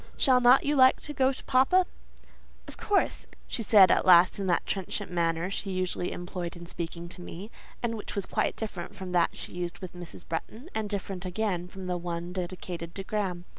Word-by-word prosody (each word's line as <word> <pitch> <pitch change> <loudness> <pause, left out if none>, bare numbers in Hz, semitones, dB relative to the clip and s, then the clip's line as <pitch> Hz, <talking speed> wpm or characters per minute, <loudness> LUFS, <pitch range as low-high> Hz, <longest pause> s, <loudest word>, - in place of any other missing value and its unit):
"Shall 255 -3 +4
not 250 +2 +6
you 295 +1 +2
like 260 -1 +6
to 295 - -4
go 265 -2 +3
to 265 - -8
papa?" 275 +9 +4 0.8
"Of - - -9
course," 410 -1 0 0.2
she 240 - -2
said 200 -4 +7
at - - +3
last 180 +1 +6
in 195 - -2
that 175 - +1
trenchant 190 -1 -3
manner 170 +1 0
she 195 - -3
usually 185 -1 -2
employed 175 -1 -5
in 170 - -9
speaking 170 0 -6
to 180 - -9
me; 185 +5 -8 0.3
and 230 -1 0
which 215 - -6
was 200 - -2
quite - - 0
different 195 -6 -6
from 185 -1 -7
that 175 -2 +2
she - - -6
used 175 -1 -4
with 185 -2 -8
Mrs. 175 -1 -10
Bretton, 225 - -5
and 215 -1 -2
different 195 -2 -3
again 185 -1 -2
from 190 +1 -9
the 180 -1 -1
one 175 0 -4
dedicated 175 -2 -5
to 195 - -4
Graham. 190 -4 -2
185 Hz, 205 wpm, -28 LUFS, 175-220 Hz, 0.8 s, said